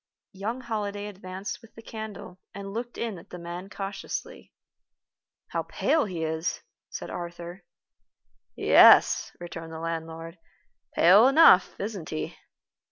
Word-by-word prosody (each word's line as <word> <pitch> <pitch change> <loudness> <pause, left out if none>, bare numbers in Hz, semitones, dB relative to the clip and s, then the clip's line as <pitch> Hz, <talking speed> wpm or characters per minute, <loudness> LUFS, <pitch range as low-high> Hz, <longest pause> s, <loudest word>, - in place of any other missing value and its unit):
Young 220 +6 -4
Holliday 205 -4 -3
advanced 190 0 -7
with 225 - -18
the 225 - -12
candle, 215 -5 -8 0.2
and 195 0 -7
looked 240 +2 -5
in 220 -6 -3
at - - -17
the - - -8
man 175 +2 -7
cautiously. 195 -1 -6 1.0
"How - - -1
pale 315 -2 +1
he 175 -5 -4
is," 160 +1 -2 0.3
said - - -7
Arthur. 175 +1 -7 0.9
"Yes," - - +6
returned 165 -2 -8
the 160 - -6
landlord, 165 +1 -5 0.6
"pale 195 +8 +7
enough, 275 - +6
isn't 200 -5 -5
he?" 75 - -4
190 Hz, 125 wpm, -27 LUFS, 170-215 Hz, 1.0 s, pale